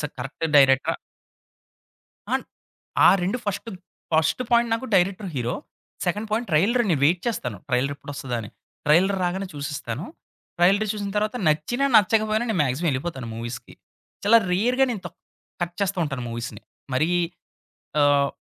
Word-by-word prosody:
స -, -, -3 dB, 0.2 s
కరెక్ట్ 135 Hz, +5 st, -5 dB
డైరెక్టరా? 135 Hz, -2 st, +5 dB, 1.4 s
అన్ -, -, 0 dB, 0.6 s
ఆ -, -, +9 dB
2 200 Hz, +7 st, 0 dB
first, 205 Hz, +2 st, -3 dB, 0.4 s
first 160 Hz, +8 st, +2 dB
point 235 Hz, -1 st, +4 dB
నాకు 230 Hz, +3 st, -2 dB
director, 190 Hz, +2 st, +1 dB
hero. 120 Hz, -1 st, -1 dB, 0.5 s
Second 210 Hz, +5 st, -1 dB
point 225 Hz, +3 st, -1 dB
trailer 210 Hz, +11 st, +3 dB
నేను 155 Hz, -6 st, +2 dB
వైట్ 170 Hz, +5 st, +3 dB
చేస్తాను 125 Hz, -, -3 dB
ట్రైలర్ 130 Hz, +2 st, +1 dB
ఎప్పుడు 145 Hz, +1 st, -9 dB
ఒస్తాదా 125 Hz, -3 st, -3 dB
అని. 105 Hz, -, -8 dB, 0.4 s
ట్రైలర్ 180 Hz, +7 st, +4 dB
రాగానే 190 Hz, +2 st, -1 dB
చూసేస్తాను. 145 Hz, -1 st, -4 dB, 0.5 s
ట్రైలరు 195 Hz, +5 st, +4 dB
చూసిన 205 Hz, -1 st, -4 dB
తరువాత 215 Hz, +2 st, 0 dB
నచ్చినా 155 Hz, -, +1 dB
నచ్చకపోయినా 215 Hz, +2 st, +3 dB
నేను 205 Hz, -, 0 dB
మాక్సిమం 140 Hz, +5 st, 0 dB
యెళ్ళిపోతాను 135 Hz, -2 st, -3 dB
మూవీస్‌కి. 115 Hz, +1 st, -7 dB, 0.5 s
చాలా 230 Hz, +3 st, +7 dB
రేర్‌గా 245 Hz, +8 st, +3 dB
నేను 215 Hz, -5 st, -4 dB
తక్ 175 Hz, -, -9 dB, 0.4 s
కట్ 175 Hz, 0 st, -2 dB
చేస్తూ 195 Hz, -1 st, 0 dB
ఉంటాను 135 Hz, -4 st, -4 dB
మూవీస్‌ని 115 Hz, -2 st, -6 dB, 0.3 s
మరి 155 Hz, +6 st, +2 dB, 0.9 s
ఆహ్, 145 Hz, -1 st, +4 dB
175 Hz, 145 wpm, -24 LUFS, 135-210 Hz, 1.4 s, ఆ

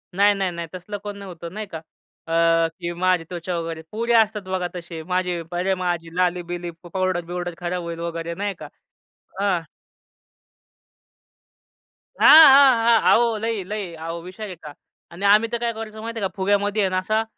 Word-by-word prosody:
नाही, 205 Hz, +2 st, +5 dB
नाही, 195 Hz, -2 st, -1 dB
नाही. 170 Hz, -1 st, -6 dB
तसलं 185 Hz, +3 st, -6 dB
कोण 205 Hz, -1 st, -6 dB
नव्हतं 175 Hz, -3 st, -9 dB
नाही 215 Hz, 0 st, -5 dB
का 160 Hz, -, -5 dB, 0.5 s
अ, -, -, -6 dB, 0.5 s
की 170 Hz, -1 st, -3 dB
माझी 180 Hz, 0 st, +1 dB
त्वचा 175 Hz, 0 st, -4 dB
वगैरे, 165 Hz, -1 st, -5 dB
पोरी 230 Hz, +2 st, -2 dB
असतात 220 Hz, -2 st, +3 dB
बघा 185 Hz, -1 st, -2 dB
तसे 170 Hz, -2 st, -7 dB
माझे 180 Hz, 0 st, -1 dB
अरे, 180 Hz, +2 st, 0 dB
माझी 175 Hz, -2 st, -2 dB
लाली-बिली, 175 Hz, -1 st, -1 dB
पावडर-बिउडर 175 Hz, -1 st, -3 dB
खराब 175 Hz, 0 st, -3 dB
होईल 170 Hz, 0 st, -6 dB
वगैरे 170 Hz, 0 st, -4 dB
नाही 200 Hz, 0 st, -2 dB
का. -, -, -7 dB, 0.7 s
अ 190 Hz, -4 st, +1 dB, 2.5 s
हां, -, -, +5 dB, 0.3 s
हां, 275 Hz, -1 st, +8 dB
हां. 230 Hz, -1 st, +5 dB
अहो 230 Hz, -2 st, +3 dB
लई-लई 210 Hz, -4 st, -4 dB
अहो 165 Hz, +1 st, -6 dB
विषय 185 Hz, +5 st, -9 dB
आहे 195 Hz, -4 st, -6 dB
का 150 Hz, -3 st, -11 dB, 0.4 s
आणि 180 Hz, +4 st, -5 dB
आम्ही 210 Hz, +3 st, +5 dB
तर 235 Hz, -, 0 dB
काय 235 Hz, 0 st, -1 dB
करायचो 220 Hz, -1 st, -8 dB
माहिती 230 Hz, 0 st, -5 dB
आहे 200 Hz, -, 0 dB
का, -, -, -18 dB
फुग्यामध्ये 205 Hz, +2 st, +1 dB
आहे 190 Hz, -, +2 dB
ना 185 Hz, -, -1 dB
असं 215 Hz, +4 st, 0 dB
185 Hz, 170 wpm, -22 LUFS, 175-210 Hz, 2.5 s, हां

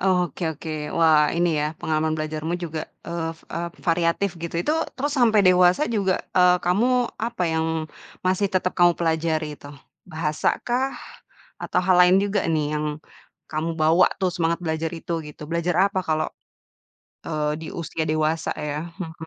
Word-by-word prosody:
Oh, 180 Hz, -2 st, +2 dB
oke -, -, -10 dB
oke. 160 Hz, -, -8 dB, 0.3 s
Wah, 155 Hz, -2 st, +5 dB
ini 175 Hz, 0 st, +2 dB
ya, 150 Hz, -, +1 dB
pengalaman 155 Hz, 0 st, 0 dB
belajarmu 155 Hz, +1 st, -3 dB
juga, 160 Hz, -2 st, -5 dB, 0.2 s
eee 165 Hz, -1 st, -2 dB, 0.2 s
eee, 170 Hz, +1 st, -2 dB
variatif, 170 Hz, +3 st, +1 dB
gitu. 170 Hz, 0 st, -5 dB
Itu 300 Hz, -, 0 dB, 0.2 s
terus 285 Hz, +2 st, -1 dB
sampai 225 Hz, -4 st, +5 dB
dewasa 180 Hz, +7 st, +5 dB
juga, 190 Hz, -2 st, +1 dB, 0.2 s
eee, 180 Hz, 0 st, +6 dB
kamu 195 Hz, +8 st, +2 dB, 0.3 s
apa 230 Hz, -4 st, -2 dB
yang 160 Hz, 0 st, 0 dB, 0.6 s
masih 190 Hz, +2 st, +2 dB
tetep 185 Hz, 0 st, +1 dB
kamu 175 Hz, -1 st, +6 dB
pelajari 160 Hz, -2 st, 0 dB
itu? 145 Hz, -, -12 dB, 0.4 s
Bahasa 155 Hz, -1 st, 0 dB
kah? 260 Hz, +3 st, 0 dB, 0.7 s
Atau 180 Hz, -, 0 dB
hal 185 Hz, -1 st, +4 dB
lain 180 Hz, +1 st, +6 dB
juga 200 Hz, 0 st, 0 dB
nih 155 Hz, -2 st, +1 dB
yang 150 Hz, -, -2 dB, 0.7 s
kamu 160 Hz, +2 st, -2 dB
bawa 165 Hz, +4 st, +5 dB
tuh 185 Hz, -, +2 dB
semangat 170 Hz, -1 st, 0 dB
belajar 160 Hz, 0 st, -1 dB
itu 170 Hz, +1 st, -5 dB, 0.2 s
gitu? 150 Hz, -, -11 dB
Belajar 170 Hz, +1 st, 0 dB
apa 190 Hz, -2 st, -1 dB
kalau, 155 Hz, 0 st, +1 dB, 1.0 s
eee, 150 Hz, -2 st, -1 dB
di 160 Hz, -, -6 dB
usia 160 Hz, 0 st, -3 dB
dewasa 155 Hz, +1 st, 0 dB
ya? 150 Hz, +3 st, -4 dB
Hmm. 165 Hz, -4 st, -6 dB
170 Hz, 160 wpm, -23 LUFS, 155-185 Hz, 1.0 s, eee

